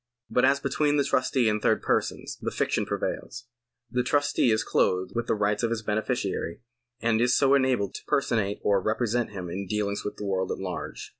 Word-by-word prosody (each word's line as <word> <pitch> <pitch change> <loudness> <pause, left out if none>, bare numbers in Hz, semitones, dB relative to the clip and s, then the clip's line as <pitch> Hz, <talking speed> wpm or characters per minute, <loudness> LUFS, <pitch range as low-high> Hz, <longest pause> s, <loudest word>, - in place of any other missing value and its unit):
But 125 - +4
as 140 +1 +4
between 150 +1 +1
the 140 - +3
trustee 130 -2 +1
and 105 -1 +1
third - - +2
persons, - - -1
the - - -1
fiction - - -1
prevails. 120 0 -4 0.5
The 125 - +1
trustee 145 0 +2
is 110 0 +2
clothed 90 -3 +1
with 120 0 -2
the - - +2
rights 105 0 0
of 115 - +1
his 115 -1 -2
beneficiary, 105 -4 -2 0.4
and 115 -1 +2
is 125 +1 +4
so 135 -1 +4
enabled 130 -8 +2
to - - -8
personate 110 -7 +1
or 100 -2 +3
represent 115 +3 0
him 95 -4 -6
in 95 +3 -5
dealings 100 0 -1
with 105 - -4
the 105 - -6
world 95 -1 -1
at - - -2
large. 95 -2 -5
110 Hz, 200 wpm, -27 LUFS, 100-125 Hz, 0.5 s, But